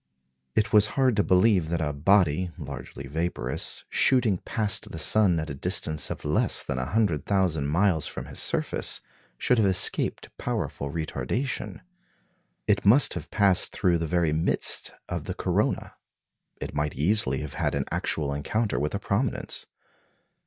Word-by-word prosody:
It 110 - 0
was 105 -1 +5
hard 130 -4 +3
to 100 - +3
believe 90 -1 +2
that 85 0 -1
a 75 -3 -2
body, 90 +2 +2
largely 70 -3 -8
vaporous, 75 -3 -3
shooting 115 -8 +2
past 105 -3 0
the - - -7
sun 90 +1 +4
at 80 -1 -5
a - - -4
distance 75 +1 +2
of - - -7
less 75 - +2
than 70 - -4
a 65 - -3
hundred 100 -7 0
thousand 90 -8 0
miles 85 0 +1
from - - -7
his - - -7
surface, - - -1 0.4
should 125 - +1
have 105 - +3
escaped 95 -1 +2
powerful 70 - -4
retardation. 105 - -4 0.8
It 105 -2 +1
must 110 +3 +6
have - - -7
passed 100 -3 +3
through 90 -4 +1
the 80 - -3
very 85 -1 0
midst 80 +2 +1 0.2
of - - -5
the - - -5
corona. - - -1 0.7
It - - -6
might 75 0 -2
easily 75 -3 +1
have 75 -2 -7
had - - -2
an 70 -1 -2
actual 70 -3 -2
encounter 105 +10 -2
with 75 +6 -2
a - - -2
prominence. 105 +4 -3
85 Hz, 160 wpm, -25 LUFS, 75-105 Hz, 0.8 s, must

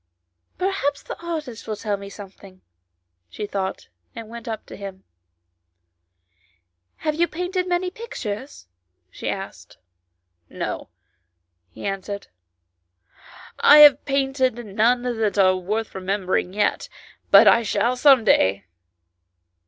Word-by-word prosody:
" 85 0 -54
Perhaps 365 -7 -1
the - - -8
artist 305 -9 -6
will 215 - -3
tell 210 0 -2
me 200 0 -9
something," 195 -2 -13 0.7
she 210 - -6
thought, 195 -2 -4 0.3
and 230 -2 -8
went 235 0 -10
up 220 -1 -5
to - - -11
him. 195 -1 -9 2.0
"Have 305 - +1
you 340 +3 +1
painted 360 +2 -3
many 360 0 -1
pictures 285 - -7 0.2
?" 90 0 -50
she - - -5
asked. - - -7 0.7
"No" - - -5 0.8
he 85 - -10
answered, 200 +1 -5 1.3
"I 295 - +8
have 290 -2 +8
painted 270 -3 0
none 225 +5 +1
that 225 -4 -1
are 185 -1 +5
worth 210 +5 -3
remembering 190 -1 -1
yet, 205 +2 -1 0.4
but - - +8
I 235 - +6
shall 225 +3 0
some 265 -2 +5
day." 100 - +3
220 Hz, 120 wpm, -22 LUFS, 195-280 Hz, 2.0 s, I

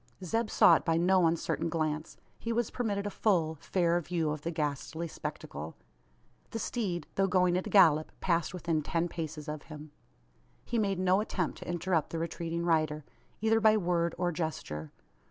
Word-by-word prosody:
Zeb 225 +5 0
saw 170 - +6
it - - -8
by 165 0 +2
no 180 0 +4
uncertain 165 -1 -1
glance. 155 -1 -2 0.2
He 230 - -3
was 235 -1 0
permitted 205 -5 -2
a 205 - -2
full, 170 -8 +1
fair 170 +2 0
view 165 -2 -1
of 150 -1 -4
the 165 - -3
ghastly 160 +1 -3
spectacle. 75 - -6 0.7
The - - -4
steed, 195 -8 -2
though 195 0 +2
going 180 -1 +3
at 185 - -1
a - - -4
gallop, 160 -6 +5
passed 170 -2 +1
within 170 -3 -1
ten 165 +3 -1
paces 160 -2 -5
of 150 -1 -4
him. 150 -1 -9 0.7
He 235 - -1
made 200 -3 +1
no 185 +2 +3
attempt 185 -5 -2
to - - -8
interrupt 175 -2 0
the 165 - -4
retreating 170 0 -3
rider 155 -3 +1 0.4
either 225 0 +3
by 220 -1 +5
word 170 -3 0
or 175 0 0
gesture. 150 - -4
170 Hz, 175 wpm, -31 LUFS, 155-185 Hz, 0.7 s, saw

